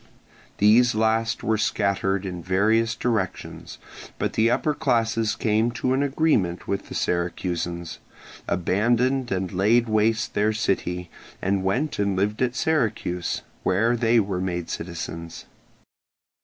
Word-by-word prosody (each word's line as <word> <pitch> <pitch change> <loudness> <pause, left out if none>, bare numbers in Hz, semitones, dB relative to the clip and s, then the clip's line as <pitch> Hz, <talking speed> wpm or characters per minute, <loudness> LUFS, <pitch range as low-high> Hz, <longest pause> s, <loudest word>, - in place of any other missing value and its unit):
These 110 +4 +5
last 110 +1 +1
were 110 -1 +1
scattered 100 -2 0
in 90 -2 -5
various 110 +6 +2
directions; 110 -6 -3 0.4
but - - -2
the 115 +1 +3
upper 150 +5 +1
classes 115 -6 +1
came 110 +1 +1
to 130 +2 0
an 135 - +1
agreement 135 - +1
with 100 - -3
the - - -7
Syracusans, 85 -1 -2 0.5
abandoned 120 +8 +1
and 95 -1 -1
laid 110 +6 +3
waste 110 0 +1
their 105 +1 +2
city, 90 -5 -2 0.3
and 95 0 0
went 125 +10 -1
and 100 -1 +1
lived 105 +4 -1
at 125 -1 +1
Syracuse, 110 - -1 0.2
where 110 +6 +2
they 120 0 +3
were 95 -3 -1
made 90 -2 -3
citizens. 85 -1 -6
105 Hz, 130 wpm, -24 LUFS, 95-115 Hz, 0.5 s, These